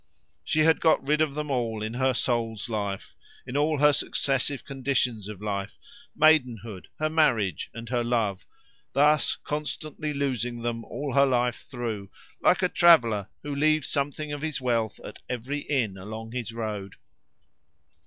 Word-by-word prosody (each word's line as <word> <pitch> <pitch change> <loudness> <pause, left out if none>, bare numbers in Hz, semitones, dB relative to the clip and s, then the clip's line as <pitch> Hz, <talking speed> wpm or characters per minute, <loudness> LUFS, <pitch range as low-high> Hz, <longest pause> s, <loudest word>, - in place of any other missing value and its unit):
She 155 - +1
had 160 +1 +4
got 160 -4 +3
rid 150 +1 +3
of 150 -3 +1
them 150 -1 -3
all 115 -4 -1
in 110 +1 -3
her 130 +1 +1
soul's 115 -2 -1
life, 100 -3 -3 0.3
in 125 +1 -7
all 150 +1 +2
her 150 +1 +5
successive 135 0 0
conditions 125 -6 -1
of 105 -1 -8
life, 100 -1 -3 0.4
maidenhood, 120 - +2
her 155 - 0
marriage, 130 - +1
and 115 0 -8
her 120 -1 0
love 115 -5 -1 0.5
thus 150 +2 +4
constantly 150 +1 -4
losing 125 -4 -2
them 115 -1 -2
all 140 -2 -4
her 140 0 +5
life 125 -2 0
through, 115 -6 -4 0.3
like 185 - +4
a - - +5
traveller 115 - +5
who 145 -1 -4
leaves 155 0 +2
something 145 +1 -2
of 145 - -5
his 155 -2 -2
wealth 115 -4 0
at - - -10
every 125 +4 -3
inn 120 -10 -1
along 110 +3 -7
his 120 -3 -4
road. 105 -4 -5
125 Hz, 155 wpm, -27 LUFS, 110-145 Hz, 0.5 s, her